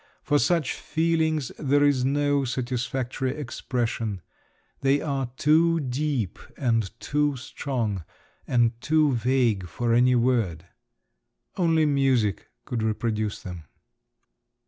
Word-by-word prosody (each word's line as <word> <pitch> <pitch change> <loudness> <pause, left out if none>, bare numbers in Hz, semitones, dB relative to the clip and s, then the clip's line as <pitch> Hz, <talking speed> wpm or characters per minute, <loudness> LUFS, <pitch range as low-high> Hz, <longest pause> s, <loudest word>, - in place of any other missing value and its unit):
For 145 -1 +2
such 160 +3 +1
feelings 160 -4 0
there 145 0 +3
is 140 -3 +3
no 145 +1 +2
satisfactory 130 +1 -2
expression; 120 - -3 0.6
they 135 +1 +3
are 135 -4 -2
too 165 +2 +4
deep 130 - -2 0.2
and 115 -6 +1
too 145 -1 0
strong 120 - -3 0.4
and 120 -2 +3
too 155 -2 +3
vague 120 -5 +1
for 115 +7 -1
any 125 +1 +4
word. 115 -10 +1 0.9
Only 165 -3 +3
music 135 - +1 0.2
could 120 -2 -3
reproduce 110 -1 -1
them. 90 -4 -8
130 Hz, 105 wpm, -25 LUFS, 115-145 Hz, 0.9 s, too